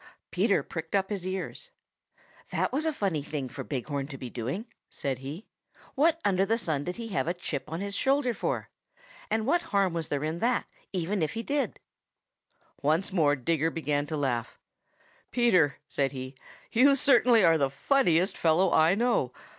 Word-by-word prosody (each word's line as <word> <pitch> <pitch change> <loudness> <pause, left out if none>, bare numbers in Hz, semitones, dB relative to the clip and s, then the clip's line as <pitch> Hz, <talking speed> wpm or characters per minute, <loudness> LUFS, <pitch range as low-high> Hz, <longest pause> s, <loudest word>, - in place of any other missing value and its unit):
Peter - - +2
pricked 160 +2 -5
up 195 +1 +1
his 190 -3 -3
ears. 190 - -5 0.8
"That - - 0
was 305 +4 0
a - - +2
funny 195 - -1
thing 140 -3 -4
for - - -6
Big 130 -5 -4
Horn 140 -2 -3
to 140 -2 -8
be 125 -2 -7
doing," 130 - -4 0.2
said 135 -2 -3
he. 145 +10 -7 0.5
"What 330 +4 +3
under 190 -1 +3
the 225 +3 +1
sun 155 -10 -1
did 180 - -3
he 230 -1 -6
have 190 -5 -1
a 175 - 0
chip 155 -5 -4
on 165 +3 -3
his 200 0 -4
shoulder 270 +3 +2
for? - - -3 0.6
And 220 0 0
what 335 +7 +2
harm 200 - +1
was 165 -2 -2
there 145 0 -2
in 160 +2 -2
that, 240 +4 +1 0.3
even 185 +1 -1
if 155 - 0
he 225 +1 -4
did?" 285 +2 -1 1.0
Once 160 +7 +1
more 150 -5 +3
Digger 160 +4 0
began 150 -3 -1
to 155 - -3
laugh. 125 -4 -2 0.7
"Peter," 185 - +3
said 135 -1 -1
he, 130 0 -6 0.4
"you 275 +4 +5
certainly 245 -5 +5
are 165 -1 +5
the 140 -1 +2
funniest 180 - +2
fellow 170 +3 +3
I 160 +4 +5
know. 230 - +1
175 Hz, 180 wpm, -28 LUFS, 145-225 Hz, 1.0 s, you